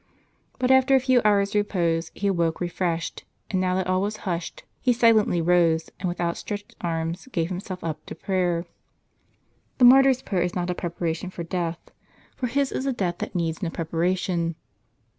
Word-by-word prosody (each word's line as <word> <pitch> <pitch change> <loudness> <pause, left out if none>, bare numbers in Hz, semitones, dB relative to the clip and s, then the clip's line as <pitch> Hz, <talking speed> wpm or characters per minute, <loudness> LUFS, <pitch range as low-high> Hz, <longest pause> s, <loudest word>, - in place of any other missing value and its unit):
But, 255 0 +1
after 265 +1 +5
a - - +6
few 255 -1 +3
hours' 200 -1 +3
repose, 170 -6 0
he 205 - -4
awoke 170 -4 +1
refreshed; 175 -1 -2 0.3
and 185 -2 +1
now 185 0 +1
that 190 -1 0
all 185 +1 +1
was 210 +2 -2
hushed, 175 -3 -3 0.2
he 250 - +2
silently 220 -7 +4
rose, 165 -2 +3
and 185 -1 -1
with 175 - -5
outstretched 205 +4 -4
arms, 165 +4 -3
gave 170 -5 -1
himself 185 0 -6
up 155 -2 -4
to - - -7
prayer. 180 -3 0 1.1
The 250 - +6
martyr's 265 +1 +6
prayer 185 -4 -1
is 180 0 -1
not 180 0 -1
a - - 0
preparation 170 0 -3
for 175 -2 -6
death; 170 -1 -4 0.4
for 250 - -2
his 275 +3 0
is 265 - -2
a 270 - +1
death 180 -6 -2
that - - -5
needs 165 0 -1
no 175 - -1
preparation. 170 +1 -1
180 Hz, 180 wpm, -25 LUFS, 170-205 Hz, 1.1 s, a